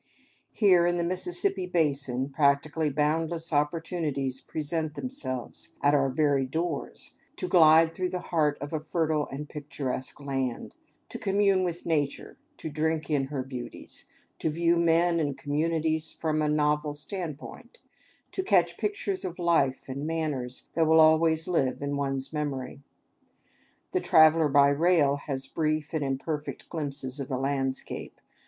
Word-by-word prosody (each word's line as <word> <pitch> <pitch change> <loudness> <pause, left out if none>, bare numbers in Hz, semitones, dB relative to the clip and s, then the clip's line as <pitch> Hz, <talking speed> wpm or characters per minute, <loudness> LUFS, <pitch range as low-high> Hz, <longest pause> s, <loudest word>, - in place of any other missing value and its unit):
Here, 180 -5 +4
in 175 0 +1
the 170 - 0
Mississippi 180 +1 0
basin, 140 -6 0
practically 145 +2 +2
boundless 160 +3 0
opportunities 150 -3 -1
present 155 0 -3
themselves, 130 - -4
at 145 0 +4
our 140 -2 +3
very 140 -1 +1
doors, 160 +1 -4 0.2
to - - -4
glide 165 -1 +6
through 185 0 -2
the 180 0 -6
heart 150 -3 +2
of 145 +3 -6
a 155 - 0
fertile 155 -1 -1
and 145 +2 -6
picturesque 140 -3 -4
land, 135 -3 -3 0.4
to - - -7
commune 195 -1 +2
with 175 -1 -3
Nature, 145 -4 -1 0.2
to - - -6
drink 160 +1 -1
in 140 -3 +2
her 135 -1 -4
beauties, 125 -2 -6 0.3
to - - 0
view 170 +2 +2
men 170 0 +3
and 145 -3 -1
communities 155 +2 -1
from 155 -1 -1
a 150 - +1
novel 150 0 +1
standpoint, 160 - -7 0.5
to 380 - -2
catch 380 - +2
pictures 405 -2 -2
of 180 -1 -5
life 165 -7 +1
and 140 +3 -4
manners 150 -6 -3
that 165 -1 +2
will 160 0 +5
always 160 +1 +4
live 140 -8 0
in 145 0 -2
one's 135 0 -3
memory. 140 -3 -4 1.1
The - - 0
traveler 155 0 +5
by 140 0 +5
rail 145 -1 +3
has 135 -2 -2
brief 155 -1 -2
and 155 -2 0
imperfect 145 +3 -4
glimpses 140 -4 -3
of 135 - -4
the 130 -2 -2
landscape. 135 0 -3
155 Hz, 145 wpm, -27 LUFS, 140-165 Hz, 1.1 s, glide